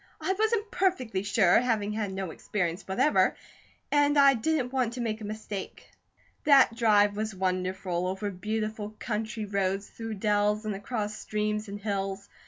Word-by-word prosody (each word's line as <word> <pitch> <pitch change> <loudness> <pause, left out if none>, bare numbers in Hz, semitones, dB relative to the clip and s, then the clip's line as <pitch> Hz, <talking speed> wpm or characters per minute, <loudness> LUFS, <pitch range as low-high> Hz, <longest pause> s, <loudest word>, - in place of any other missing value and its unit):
"I 380 - 0
wasn't 435 +1 0
perfectly 255 - 0
sure, 200 -3 +4
having 220 -4 0
had 210 -2 -2
no 190 -3 -4
experience 175 0 -2
whatever, 255 +10 +3 0.6
and 290 0 +3
I 280 -1 +7
didn't 260 +1 -1
want 250 -3 0
to 250 - -6
make 225 -2 -2
a - - -5
mistake." 210 -2 -7 0.5
That 275 -5 +6
drive 210 -3 +4
was 215 -1 -3
wonderful, 185 -1 -1
over 195 +2 -3
beautiful 215 +2 -4
country 220 -1 -3
roads, 195 0 -1
through 225 -1 -6
dells, 210 +1 +1
and 215 - -1
across 210 +1 -4
streams 210 0 -2
and 200 +1 -6
hills. 195 -1 -3
210 Hz, 155 wpm, -28 LUFS, 200-230 Hz, 0.6 s, I